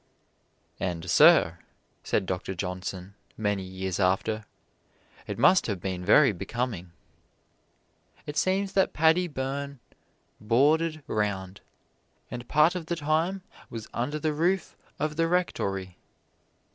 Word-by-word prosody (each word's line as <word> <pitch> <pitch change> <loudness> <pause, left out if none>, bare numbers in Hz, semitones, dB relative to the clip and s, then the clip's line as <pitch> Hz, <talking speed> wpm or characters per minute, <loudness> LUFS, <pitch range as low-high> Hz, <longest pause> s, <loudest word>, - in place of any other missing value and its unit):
"And, 90 -1 -3
Sir," 80 +1 +6 0.4
said - - 0
Doctor 95 +1 -3
Johnson, 90 +1 -5 0.2
many 105 -2 0
years 95 0 -4
after, 105 +3 +1 0.8
"it - - -4
must 190 - +5
have 100 -5 -2
been 90 0 -4
very 125 +8 +6
becoming." 100 -1 -4 1.3
It 150 - -6
seems 195 +2 +1
that 190 - +2
Paddy 160 +3 +3
Byrne 140 -1 -4 0.6
"boarded 150 +8 +2
round," 100 -3 -2 0.7
and 120 0 -6
part 150 +3 +4
of 175 -3 -5
the 170 - -1
time 165 +5 0 0.3
was 115 -2 -7
under 145 +6 -2
the 155 0 -1
roof 175 +4 0 0.2
of 150 0 -2
the 165 0 +2
rectory. 95 - -1
120 Hz, 120 wpm, -27 LUFS, 95-155 Hz, 1.3 s, Sir